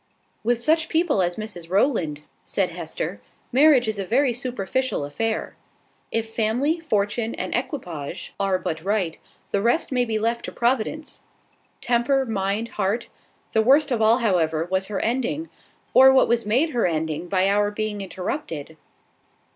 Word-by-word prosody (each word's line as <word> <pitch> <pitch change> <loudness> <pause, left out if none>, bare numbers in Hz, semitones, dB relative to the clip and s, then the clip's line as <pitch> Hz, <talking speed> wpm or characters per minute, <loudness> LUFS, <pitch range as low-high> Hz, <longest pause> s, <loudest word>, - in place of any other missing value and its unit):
"With 235 +1 +1
such 315 +5 +2
people 320 - +2
as 175 -1 0
Mrs 185 -6 -7
Rowland," 180 - +1 0.2
said - - -1
Hester, - - -5 0.3
"marriage 265 -2 +5
is 215 -2 -2
a - - -1
very 245 +6 +2
superficial 250 - -2
affair. 220 +10 -3 0.6
If 225 0 -2
family, 245 +10 +1
fortune, 220 -5 -1
and - - -4
equipage 180 - -4
are 195 -1 +2
but 160 -3 -4
right, 190 -5 -1 0.3
the 200 - +1
rest 240 +9 +1
may 250 -1 +2
be 225 -2 -1
left 230 +2 -1
to - - -5
Providence. 250 +5 -1 0.6
Temper, 245 +3 +2
mind, 210 0 -1
heart. 210 +5 -1 0.4
The 220 - +3
worst 275 +5 +4
of 235 -3 +1
all, 220 +2 +5
however, 170 -8 +1
was 190 0 0
her 205 -2 -3
ending 260 +7 -1 0.4
or 265 +1 +8
what 265 - +5
was 235 -2 +1
made 265 +9 +2
her 240 -7 +1
ending 160 0 -2
by 185 0 +2
our 205 +1 +2
being 210 -1 -3
interrupted." 180 - -5
220 Hz, 155 wpm, -24 LUFS, 190-255 Hz, 0.6 s, or